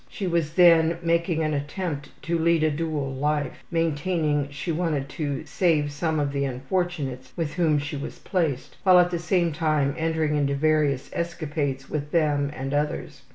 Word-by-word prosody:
She 200 - -5
was 170 -3 0
then 170 -2 +6
making 170 -1 +1
an 155 0 0
attempt 145 +1 -3
to 170 +3 0
lead 165 -1 +3
a 155 - +3
dual 150 -3 -2
life, 145 0 -1
maintaining 155 -3 0
she 145 +4 -4
wanted 155 -4 -1
to 145 +1 -3
save 155 -3 +1
some 155 +1 -1
of 145 -1 0
the 140 0 -1
unfortunates 135 -1 -2
with 160 -3 -2
whom 165 -4 +2
she 145 +1 -3
was 140 - -6
placed, 160 -9 -2
while 185 -2 +6
at 180 0 +5
the 170 - -1
same 170 0 +1
time 150 -3 +1
entering 160 -2 0
into 140 -1 +1
various 145 -2 +1
escapades 150 -5 -3
with 145 -1 -3
them 145 -3 +1
and 135 +1 -4
others. 150 +1 -2
155 Hz, 170 wpm, -25 LUFS, 145-170 Hz, -, then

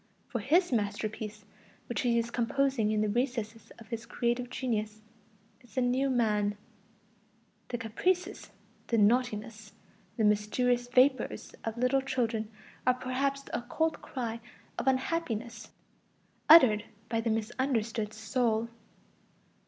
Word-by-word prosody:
For 240 - -2
his 330 - +3
masterpiece, 215 -1 -2 0.4
which 240 - -2
he 240 -1 +2
is 230 0 -1
composing 245 -1 +1
in 215 -1 +1
the 215 - +1
recesses 225 -1 -2
of 230 - -14
his 230 -1 -5
creative 240 +1 -1
genius, 215 -4 -3 0.6
is 245 - -20
the 260 - +2
new 255 +2 +2
man. 210 -4 +1 1.1
The 240 - -3
"caprices," 345 +12 -1 0.4
the 230 - +1
"naughtinesses," 215 -1 +1 0.4
the 225 - +1
"mysterious 240 +4 +2
vapors" 260 +2 +2
of 225 0 -4
little 250 +3 +2
children 230 -5 -1 0.4
are 255 - +5
perhaps 270 +2 -1
the - - -6
occult 310 +6 -1
cry 235 -3 -4 0.4
of - - -4
unhappiness 245 -5 -1 0.8
uttered 255 -10 +8 0.2
by 225 -1 0
the 230 - -1
misunderstood 225 -1 -1
soul. 220 +1 0
235 Hz, 120 wpm, -30 LUFS, 220-255 Hz, 1.1 s, uttered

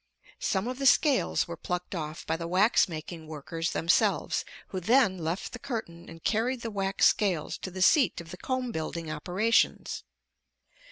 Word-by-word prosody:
Some 195 +2 0
of 255 +1 -4
the 275 - +3
scales 275 -4 +3
were 170 - -5
plucked 180 +2 -4
off 155 -2 -5
by - - 0
the 165 0 -5
wax 190 +4 +4
making 160 0 -7
workers 165 +2 -4
themselves, 165 +1 +1 0.3
who 190 - -3
then 215 -1 +3
left 165 +3 -3
the 245 - -6
curtain 220 -11 -6
and 165 0 -12
carried 235 +3 0
the 230 - -4
wax 195 -1 +1
scales 185 -7 +2
to - - -5
the 185 0 -1
seat 265 - +4
of 165 -1 -10
the 180 - -8
comb 255 +3 -2
building 160 -2 -4
operations. 185 +9 +1
185 Hz, 170 wpm, -28 LUFS, 165-230 Hz, 0.3 s, wax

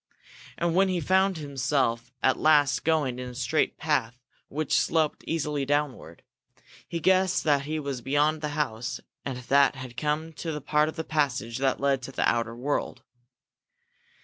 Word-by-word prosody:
And 170 -1 0
when 190 +2 +4
he 185 -1 0
found 190 +3 +2
himself 130 -4 -1
at 130 - +3
last 150 -2 +4
going 150 -6 +1
in 125 0 -5
a 125 - -10
straight 135 +5 0
path 130 -7 0 0.3
which 155 0 -1
sloped 160 -2 +1
easily 150 -3 -1
downward, 140 - -2 0.6
he 170 - -3
guessed 185 +1 +3
that 145 -3 +2
he 155 +1 -2
was 140 -4 -4
beyond 145 +4 +1
the 150 - -2
house, 120 -5 -2 0.2
and 130 -2 -4
that 140 +3 +3
he 135 - -8
had 125 -2 -10
come 155 +2 -1
to 165 -2 -3
a - - -3
part 150 +2 +2
of - - -8
the 160 - -3
passage 130 -7 -1
that 135 -1 +1
led 140 -1 +1
to 130 - -7
the - - 0
outer 115 -1 0
world. 135 +5 -2
145 Hz, 175 wpm, -27 LUFS, 130-155 Hz, 0.6 s, when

